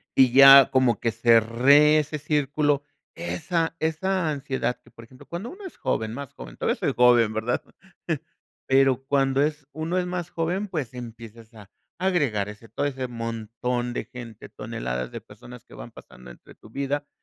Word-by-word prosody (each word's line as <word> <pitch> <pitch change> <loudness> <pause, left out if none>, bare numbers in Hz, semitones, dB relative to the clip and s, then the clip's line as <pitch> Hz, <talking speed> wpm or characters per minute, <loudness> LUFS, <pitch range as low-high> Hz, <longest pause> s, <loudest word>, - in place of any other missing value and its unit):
y 130 -2 +5
ya 135 +1 +9
como 130 -4 +2
que 115 - 0
cerré 120 +7 +4
ese 150 0 -4
círculo, 145 -1 0 0.3
esa 165 -1 -2
esa 165 +2 -1
ansiedad 135 -3 -3
que, - - -21
por 115 - -14
ejemplo, 130 +2 -17
cuando 180 +8 -6
uno 385 +2 -11
es 370 - -9
joven, 110 0 -2
más 140 0 -8
joven, - - -11
todavía - - 0
soy - - -1
joven, 120 -3 +4
¿verdad? 110 +3 -2 1.1
Pero, 135 -1 +3
cuando 135 -1 +1
es 150 -1 -1
uno 160 +4 -3
es 180 - 0
más 180 -1 -4
joven, 180 +5 -2
pues, 145 -9 -4
empiezas 115 -1 -11
a 105 -2 -15 0.3
agregar 140 - 0
ese, 105 +2 -12
todo 130 - -3
ese 130 -2 -3
montón 115 +1 -4
de - - -4
gente, 115 -3 -11
toneladas 60 0 -5
de - - -7
personas 125 -2 -14
que - - -18
van - - -10
pasando 65 0 -14
entre - - -16
tu 110 - -17
vida. 140 +3 -3
135 Hz, 170 wpm, -24 LUFS, 115-150 Hz, 1.1 s, ya